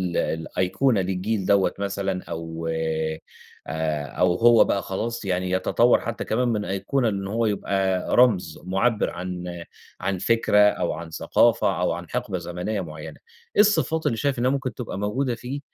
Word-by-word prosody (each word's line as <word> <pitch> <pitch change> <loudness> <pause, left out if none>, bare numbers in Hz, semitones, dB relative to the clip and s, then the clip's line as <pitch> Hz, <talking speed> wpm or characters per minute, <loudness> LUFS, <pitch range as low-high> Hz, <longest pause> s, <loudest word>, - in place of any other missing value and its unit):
الأيقونة 95 +8 0
للجيل 95 +2 -2
دَوَّة 100 -1 +3
مثلًا 100 -2 -2
أو 80 0 -6
آآ، 80 -1 -2 0.9
أو 90 +7 +1
هو 115 +3 +6
بقى 100 - 0
خلاص 115 +4 -4
يعني 90 -1 -1
يتطور 115 +6 +3
حتّى 115 -1 -4
كمان 125 +3 0
من 105 -3 -1
أيقونة 115 +5 0
إن 100 -1 -3
هو 115 +3 0
يبقى 95 -3 0
رمز 100 -10 +3
معبر 95 +5 +1
عن 90 -1 -6 0.4
عن 95 -1 -1
فكرة 105 +1 +2
أو 105 -5 +3
عن 80 +1 -7
ثقافة - - +2
أو - - +1
عن - - -5
حقبة 95 - -2
زمنيّة 90 +4 -3
معيّنة. 75 -2 -8 0.4
إيه - - +7
الصفات 200 -6 +2
اللي 115 - +1
شايف 140 0 0
إنّها 125 +2 +2
ممكن 130 -4 -2
تبقى 115 -5 -6
موجودة 120 +5 -1
فيه، 125 +4 -6
100 Hz, 155 wpm, -24 LUFS, 90-115 Hz, 0.9 s, إيه